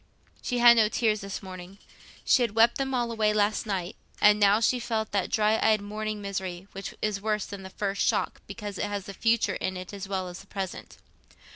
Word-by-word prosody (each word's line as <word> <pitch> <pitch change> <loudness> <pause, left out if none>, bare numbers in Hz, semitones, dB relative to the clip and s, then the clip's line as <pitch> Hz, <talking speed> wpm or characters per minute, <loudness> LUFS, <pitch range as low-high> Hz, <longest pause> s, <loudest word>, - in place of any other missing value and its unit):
She 245 - -2
had 240 0 +8
no 215 -2 +5
tears 215 -2 +1
this 195 0 -6
morning. 185 0 -9 0.5
She 260 - +4
had 230 -3 0
wept 230 +3 +4
them 270 -1 -1
all 240 -1 0
away 215 -2 +1
last 210 +1 +1
night, 190 -2 -3 0.2
and 210 0 +6
now 205 +1 +5
she 245 +2 +2
felt 220 -2 -2
that 200 -2 0
dry 220 -1 +2
eyed 215 -1 +4
morning 210 +1 -5
misery, 190 -2 -4
which 195 +1 -7
is 210 -2 -1
worse 210 -1 -1
than 200 -1 -8
the 190 - -9
first 195 0 -3
shock - - 0
because 205 -2 -7
it - - 0
has 200 -2 -4
the 200 - -7
future 230 +3 +1
in 185 0 -3
it 185 +2 -8
as 200 -1 -6
well 190 -2 -2
as 180 0 -8
the 195 - -14
present. 190 -2 -6
205 Hz, 220 wpm, -27 LUFS, 195-220 Hz, 0.5 s, had